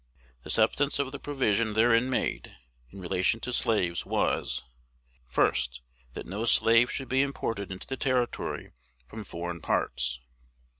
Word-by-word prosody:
The - - -11
substance 145 0 +2
of 140 -1 -1
the 140 - -7
provision 115 -7 0
therein 115 +3 +4
made, 130 - -2 0.3
in 95 - -12
relation 95 +4 0
to 125 - -3
slaves, 100 -9 +1
was, - - 0 0.6
First, 60 0 +1 0.3
That - - -7
no 105 +5 -4
slave 115 +1 +5
should 135 - -4
be 130 +1 +2
imported 115 -8 -3
into 95 +1 -7
the 135 - -5
Territory 125 -2 -1 0.3
from 110 - -8
foreign 85 -3 -6
parts. 65 -4 0
110 Hz, 140 wpm, -28 LUFS, 85-130 Hz, 0.6 s, slave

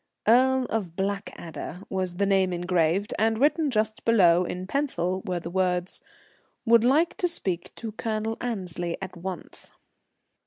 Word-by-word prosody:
"Earl 260 +3 +5
of 190 -7 -2
Blackadder" 190 -3 -4
was 185 -2 -2
the 200 - +2
name 190 -2 +3
engraved, 175 +2 +1
and 220 +1 +2
written 295 +4 +3
just 220 -1 -1
below 180 -6 +5
in 180 +1 -4
pencil 185 -7 -1
were 180 -1 -1
the 170 0 -7
words, 180 -1 -1 0.6
"would 230 -1 +6
like 300 +8 +3
to 355 - +1
speak 185 - -3
to 225 -2 -6
Colonel 220 0 -2
Annesley 180 -7 -3
at 190 -1 -7
once." 180 +1 -7
195 Hz, 145 wpm, -26 LUFS, 180-225 Hz, 0.6 s, would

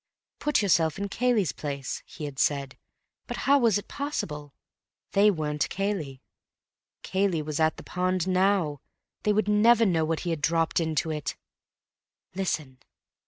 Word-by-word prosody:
Put 295 -7 +1
yourself 165 -5 +3
in 200 0 -3
Cayley's 230 - +1
place, 140 -2 -5
he 150 - -7
had 140 -2 -7
said. 140 -2 0 0.5
But - - -4
how 280 +1 +5
was 230 -6 +4
it 205 - -7
possible? 150 - -4 0.6
They 205 +2 +5
weren't 150 -5 -1
Cayley. 185 -10 -3 0.8
Cayley 190 -4 0
was 150 0 -3
at 160 0 +2
the - - -9
pond 185 0 -1
now. 185 -6 +2 0.4
They 210 - +2
would 210 -1 +1
never 225 +2 +5
know 170 -5 +2
what 160 0 -1
he 175 - -2
had 160 -3 -2
dropped 165 +2 +2
into 160 -1 0
it. 150 -2 -3 1.0
Listen!.... 155 -8 -3
170 Hz, 150 wpm, -27 LUFS, 150-200 Hz, 1.0 s, how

